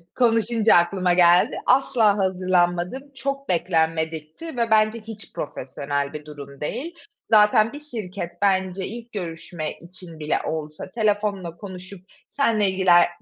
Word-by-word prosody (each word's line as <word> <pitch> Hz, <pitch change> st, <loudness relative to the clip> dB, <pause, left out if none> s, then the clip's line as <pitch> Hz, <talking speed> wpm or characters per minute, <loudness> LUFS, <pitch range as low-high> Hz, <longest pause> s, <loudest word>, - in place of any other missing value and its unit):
Konuşunca 230 Hz, -2 st, +3 dB
aklıma 180 Hz, +1 st, +3 dB
geldi. 175 Hz, 0 st, +5 dB
Asla 235 Hz, -6 st, +3 dB
hazırlanmadım, 185 Hz, +6 st, 0 dB
çok 275 Hz, 0 st, -4 dB
beklenmedikti 160 Hz, -, -1 dB
ve 230 Hz, -1 st, 0 dB
bence 215 Hz, +1 st, +3 dB
hiç 215 Hz, -4 st, -10 dB
profesyonel 140 Hz, 0 st, -4 dB
bir 150 Hz, -1 st, -7 dB
durum 140 Hz, -2 st, -11 dB
değil. 265 Hz, -, -4 dB, 0.3 s
Zaten 215 Hz, +1 st, +5 dB
bir 290 Hz, -, -7 dB
şirket, 205 Hz, -, -6 dB
bence 190 Hz, -1 st, +1 dB
ilk 235 Hz, +2 st, -9 dB
görüşme 165 Hz, -4 st, -5 dB
için 170 Hz, -1 st, -11 dB
bile 150 Hz, 0 st, 0 dB
olsa 155 Hz, +2 st, -5 dB
telefonla 205 Hz, -5 st, -1 dB
konuşup 185 Hz, 0 st, -9 dB, 0.3 s
senle 220 Hz, -8 st, +2 dB
ilgiler 185 Hz, -2 st, +5 dB
185 Hz, 125 wpm, -23 LUFS, 170-220 Hz, 0.3 s, geldi